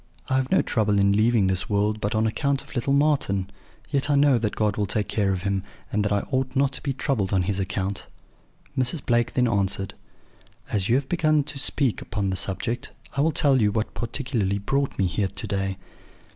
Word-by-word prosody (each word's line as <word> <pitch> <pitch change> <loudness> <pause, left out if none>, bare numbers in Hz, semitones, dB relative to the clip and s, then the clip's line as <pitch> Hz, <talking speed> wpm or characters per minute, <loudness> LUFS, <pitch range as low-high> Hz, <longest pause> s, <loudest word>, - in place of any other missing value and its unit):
I 130 - +2
have 130 0 0
no - - +3
trouble 105 -3 +1
in 100 0 +4
leaving 110 0 +3
this 95 -1 -1
world 105 +1 +1
but 105 +2 -1
on 110 +1 +2
account 140 +5 0
of - - -14
little 130 +1 -1
Marten; 140 -10 +1 0.4
yet 140 0 +1
I 145 - +4
know 140 -3 +4
that 105 -2 -2
God 105 -2 +1
will 105 -1 -1
take 105 +1 -1
care 100 -2 +1
of 95 -1 -2
him, 100 -1 0 0.3
and 105 0 +1
that 105 - -1
I 100 -1 +2
ought 130 0 -1
not 135 0 +3
to 130 - -8
be 140 - -1
troubled 130 -7 -1
on 95 -2 +2
his 100 +1 -1
account.' 95 0 -3 0.7
"Mrs. 130 +3 +1
Blake 120 -1 +1
then 125 -1 +2
answered: 100 -3 -1 0.8
"'As 100 -1 0
you 120 - +4
have 135 0 0
begun 155 -3 +2
to 140 0 -7
speak 135 -2 +1
upon 100 -3 -2
the - - -1
subject, 100 +6 -2 0.3
I 140 - +1
will 160 +2 +3
tell 140 -3 +3
you 105 -1 +3
what 110 +1 -2
particularly 120 -5 -1
brought 135 +7 -1
me 95 - +2
here 95 +3 0
to 100 +3 -7
day.' 95 -1 -2
110 Hz, 215 wpm, -25 LUFS, 100-135 Hz, 0.8 s, in